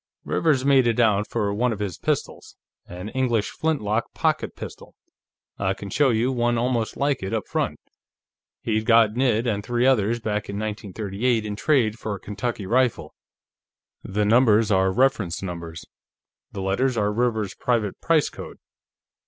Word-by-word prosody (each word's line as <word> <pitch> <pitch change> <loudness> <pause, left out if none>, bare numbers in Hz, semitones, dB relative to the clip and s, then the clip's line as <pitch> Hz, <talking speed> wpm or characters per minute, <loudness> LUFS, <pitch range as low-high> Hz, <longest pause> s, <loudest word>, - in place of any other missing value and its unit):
"Rivers 140 -5 +1
made 135 -3 +5
it 115 0 +1
out 105 -3 +2
for 105 -3 -1
one 120 +4 +1
of 110 - -3
his 100 -4 -4
pistols. - - -3 0.3
An 90 +4 -7
English 120 -4 0
flintlock 115 -10 -1
pocket - - 0
pistol; - - -10 0.6
I 95 0 0
can 100 -1 -8
show 145 -2 +3
you 120 +2 +1
one 120 -1 +1
almost 120 -2 -1
like 140 0 0
it, 95 +4 -2
up 110 - -3
front. - - -2 0.8
He'd 110 -1 -1
gotten 115 +1 +4
it 120 -3 +2
and 105 -4 -1
three 120 +2 0
others, 120 -3 +2
back 105 -2 -3
in 100 - -4
1938, 110 +2 -2
in 105 -1 -4
trade 115 -3 +1
for 105 -2 -3
a - - -9
Kentucky 105 +1 -4
rifle. 125 +3 +1 0.9
The 105 +2 -1
numbers 110 -1 +4
are 95 -1 +3
reference 110 -7 +1
numbers; 85 -3 -6 0.7
the 95 - -5
letters 120 +6 0
are 105 -1 +1
Rivers's 110 -3 0
private 115 -5 -1
price 165 -3 +2
code. - - -10
110 Hz, 160 wpm, -24 LUFS, 105-125 Hz, 0.9 s, made